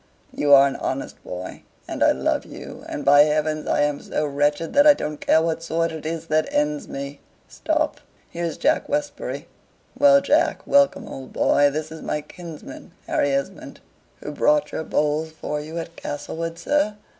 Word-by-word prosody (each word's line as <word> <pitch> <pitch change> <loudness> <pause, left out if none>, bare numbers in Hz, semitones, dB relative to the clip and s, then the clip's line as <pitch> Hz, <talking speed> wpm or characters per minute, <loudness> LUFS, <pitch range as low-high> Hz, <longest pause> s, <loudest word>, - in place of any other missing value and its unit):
"You 145 - 0
are 135 0 +7
an 135 - -4
honest 135 +1 -4
boy, 90 +1 -7 0.3
and - - -1
I - - +6
love 65 - 0
you; - - -10
and, - - -5
by 145 +1 +7
heavens, 155 0 +1
I - - +2
am 145 -1 0
so 155 - -2
wretched 145 +2 0
that 285 +1 +6
I 295 - +8
don't 150 - -5
care 160 - +3
what 165 0 -1
sword 165 0 -1
it 155 -1 -6
is 165 0 -4
that 155 -1 0
ends 150 0 0
me. 140 +1 -6 0.3
Stop, - - -1 0.3
here's 170 -1 -4
Jack 305 +2 +1
Westbury. 295 0 -3 0.5
Well, 280 +1 +6
Jack! 290 +3 +1
Welcome, 280 -4 +3
old 135 -1 -9
boy! 145 0 +3
This 155 +2 -4
is 160 - -8
my 150 - -2
kinsman, 165 +1 -11
Harry 145 - +1
Esmond." 140 +8 -4 0.4
"Who - - -5
brought 295 0 +2
your - - -3
bowls 150 +1 0
for 150 -1 -4
you 155 +3 -7
at 165 0 -6
Castlewood, 165 +3 -5
sir?" 290 -6 0
155 Hz, 180 wpm, -23 LUFS, 145-170 Hz, 0.5 s, I